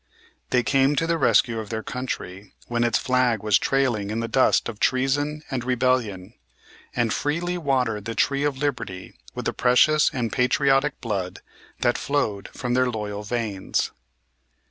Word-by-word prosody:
They 125 -1 +2
came 135 +2 +3
to 165 - +1
the 165 0 0
rescue 115 -6 +3
of 110 -2 -7
their 110 -1 -4
country 100 -6 -6
when 120 0 -1
its 120 - +2
flag 125 -4 +1
was 105 -2 +4
trailing 125 -7 0
in 110 +2 -2
the 115 - -2
dust 130 +3 +3
of 110 -3 -7
treason 145 +4 0
and 130 -3 -2
rebellion, 120 -6 0 0.6
and 120 -3 +1
freely 170 +4 -1
watered 130 - 0
the 115 - -4
tree 140 0 +1
of 145 -2 0
liberty 115 -10 -4 0.2
with - - -5
the - - 0
precious 150 +5 +4
and 120 -3 -2
patriotic 135 +3 +2
blood 100 -6 -3 0.4
that 120 -1 +2
flowed 110 -9 -1
from 125 -1 -3
their 130 0 +2
loyal 105 -3 -4
veins. 105 -3 -2
125 Hz, 160 wpm, -24 LUFS, 110-135 Hz, 0.6 s, was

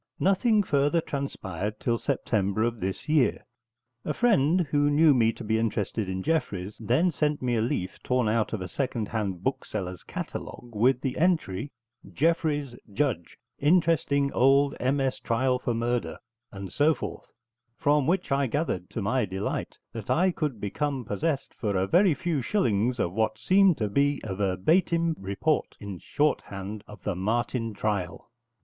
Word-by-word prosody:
Nothing 205 +3 +3
further 145 0 +2
transpired 105 - -4
till 115 -1 0
September 110 -6 0
of 115 -1 -1
this 95 0 -4
year. 150 -5 +2 0.6
A 150 - -2
friend 185 - +3
who 145 0 +3
knew 150 +1 +5
me 115 -3 +3
to - - -9
be 110 +1 +1
interested 110 -2 -1
in 95 0 -3
Jeffreys 105 - -1
then 125 - +2
sent 150 -2 0
me 120 -1 +1
a 110 - +1
leaf 95 -5 -2
torn 125 -2 +1
out 110 0 +1
of 110 - -3
a - - -5
second 120 -5 -2
hand 100 -5 -3
bookseller's 90 -2 -3
catalogue 120 -1 -7
with 125 +4 +3
the 130 -2 -2
entry: 150 - +1 0.4
JEFFREYS, 150 -4 0 0.2
JUDGE: 105 - -1 0.2
Interesting 150 -3 +2
old 140 +2 +4
MS. 135 0 0
trial 125 +2 +1
for 120 -2 -1
murder, 120 +1 -1 0.3
and 100 -2 -8
so 150 +2 +3
forth, - - -7 0.5
from 145 -1 +2
which 180 -2 0
I 135 0 +2
gathered, 120 - -2
to 110 - -4
my 120 +4 +1
delight, 95 +1 -4 0.2
that 115 -3 -7
I 185 +3 +3
could 150 -9 -3
become 130 +5 -2
possessed, 140 +8 -2
for 105 -4 -2
a 95 - +2
very 175 - +4
few 145 +2 -1
shillings, 120 - +1
of 85 - 0
what 110 +1 0
seemed 185 - +4
to 110 - 0
be 140 +6 +1
a 100 - -4
verbatim 160 - +1
report, 100 +11 -1
in 100 -3 -7
shorthand, 105 - -2
of 105 - -13
the 105 - -1
Martin 115 +4 -1
trial. 100 -4 -3
125 Hz, 160 wpm, -27 LUFS, 105-150 Hz, 0.6 s, knew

